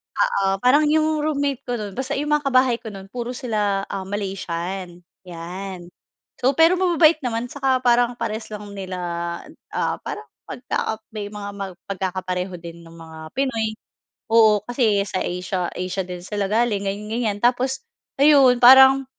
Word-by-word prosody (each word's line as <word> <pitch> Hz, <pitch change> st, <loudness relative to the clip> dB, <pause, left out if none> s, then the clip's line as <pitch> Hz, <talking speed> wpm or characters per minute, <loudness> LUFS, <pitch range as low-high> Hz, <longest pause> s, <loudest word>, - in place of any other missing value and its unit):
oo, 195 Hz, -, +1 dB, 0.2 s
parang 290 Hz, +5 st, +5 dB
yung 310 Hz, 0 st, +3 dB, 0.2 s
roommate 285 Hz, -3 st, -1 dB
ko 245 Hz, -, -2 dB
nun, 205 Hz, -3 st, -6 dB
basta 265 Hz, -, -2 dB
yung 295 Hz, +2 st, -2 dB
mga 300 Hz, -1 st, +2 dB
kabahay 255 Hz, -2 st, +4 dB
ko 225 Hz, -, -7 dB
nun 195 Hz, -1 st, -10 dB
puro 245 Hz, 0 st, -4 dB
sila, 210 Hz, -5 st, -1 dB
ah, 195 Hz, -1 st, -4 dB
Malaysian, 185 Hz, -2 st, -4 dB, 0.3 s
yan. 175 Hz, +1 st, -7 dB, 0.5 s
So, 260 Hz, +2 st, +3 dB
pero 330 Hz, +3 st, +6 dB
mababait 340 Hz, -3 st, +4 dB
naman 235 Hz, 0 st, -2 dB
saka 270 Hz, -2 st, 0 dB
parang 245 Hz, 0 st, +3 dB
parehas 220 Hz, -1 st, -3 dB
lang 210 Hz, 0 st, -7 dB
nila, 190 Hz, -2 st, -6 dB, 0.8 s
ah, -, -, -1 dB
parang -, -, -6 dB, 0.2 s
pagka 220 Hz, -3 st, -3 dB
may 210 Hz, -2 st, -4 dB
mga 205 Hz, -1 st, -6 dB, 0.4 s
pagkakapareho 185 Hz, -1 st, -3 dB
din 170 Hz, 0 st, -10 dB
nung 165 Hz, 0 st, -14 dB
mga 160 Hz, -1 st, -10 dB
Pinoy. 230 Hz, -5 st, -1 dB, 0.6 s
Oo, 220 Hz, -3 st, +5 dB
kasi 230 Hz, -4 st, +1 dB
sa 185 Hz, -, -2 dB
Asia 180 Hz, 0 st, -2 dB
Asia 185 Hz, +1 st, -3 dB
din 180 Hz, -1 st, -7 dB
sila 205 Hz, +1 st, -2 dB
galing, 215 Hz, -3 st, +1 dB
ganiyan-ganiyan. 210 Hz, +1 st, -2 dB
Tapos 255 Hz, +2 st, +1 dB, 0.4 s
ayun, 275 Hz, -4 st, +6 dB
parang, 265 Hz, +2 st, +8 dB
215 Hz, 150 wpm, -22 LUFS, 190-255 Hz, 0.8 s, parang